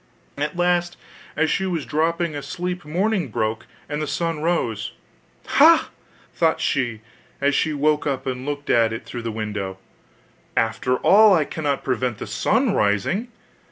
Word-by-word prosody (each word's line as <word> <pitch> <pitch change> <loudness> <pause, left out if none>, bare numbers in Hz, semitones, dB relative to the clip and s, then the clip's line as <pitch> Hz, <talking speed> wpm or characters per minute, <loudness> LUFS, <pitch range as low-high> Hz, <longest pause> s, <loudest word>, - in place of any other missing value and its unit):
At 150 +3 -3
last, 175 0 +1 0.4
as 160 0 +1
she 190 0 0
was 170 -6 -2
dropping 165 +1 0
asleep, 175 +5 -4
morning 185 +3 0
broke, 110 0 -2 0.2
and 150 +1 -3
the 155 - -2
sun 165 +1 -2
rose. 120 -11 -1 0.5
'Ha!' - - +5 0.4
thought - - +2
she, 120 -5 -1 0.4
as 140 +1 +2
she 155 - +1
woke 150 +1 +1
up 135 -2 -2
and 130 -1 -3
looked 145 0 -3
at 115 -1 +4
it 115 - -6
through 120 - -6
the 115 -1 -3
window, 105 -3 -4 0.8
'after 115 +3 +1
all 205 +8 +6
I 155 -3 +2
cannot 145 -3 -2
prevent 125 -3 -1
the - - -6
sun 215 - +1
rising. 105 - +1
145 Hz, 155 wpm, -22 LUFS, 120-175 Hz, 0.8 s, all